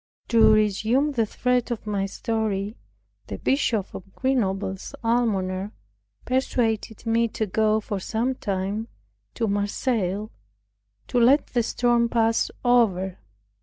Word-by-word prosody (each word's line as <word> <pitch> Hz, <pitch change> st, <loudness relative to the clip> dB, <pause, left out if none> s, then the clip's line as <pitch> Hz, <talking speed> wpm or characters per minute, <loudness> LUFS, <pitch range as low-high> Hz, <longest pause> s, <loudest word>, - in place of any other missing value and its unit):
To 230 Hz, -2 st, +6 dB
resume 220 Hz, +7 st, +2 dB
the 230 Hz, -5 st, 0 dB
thread 250 Hz, +3 st, 0 dB
of 235 Hz, -3 st, -4 dB
my 200 Hz, -2 st, -1 dB
story, 215 Hz, -1 st, -2 dB, 0.5 s
the -, -, -5 dB
Bishop 230 Hz, -7 st, 0 dB
of 195 Hz, +1 st, -10 dB
Grenoble's 200 Hz, -4 st, -1 dB
Almoner 205 Hz, -4 st, 0 dB, 0.5 s
persuaded 235 Hz, -4 st, -1 dB
me 230 Hz, +1 st, +2 dB
to 220 Hz, 0 st, -2 dB
go 215 Hz, +2 st, +2 dB
for 205 Hz, -2 st, -4 dB
some 230 Hz, +7 st, -1 dB
time 200 Hz, 0 st, -3 dB, 0.5 s
to 225 Hz, -, 0 dB
Marseilles, 205 Hz, 0 st, -1 dB, 0.8 s
to 245 Hz, -, +1 dB
let 260 Hz, +5 st, +5 dB
the 245 Hz, -, +3 dB
storm 235 Hz, 0 st, +1 dB
pass 230 Hz, -1 st, +2 dB, 0.2 s
over. 195 Hz, -7 st, +2 dB
220 Hz, 120 wpm, -24 LUFS, 200-240 Hz, 0.8 s, To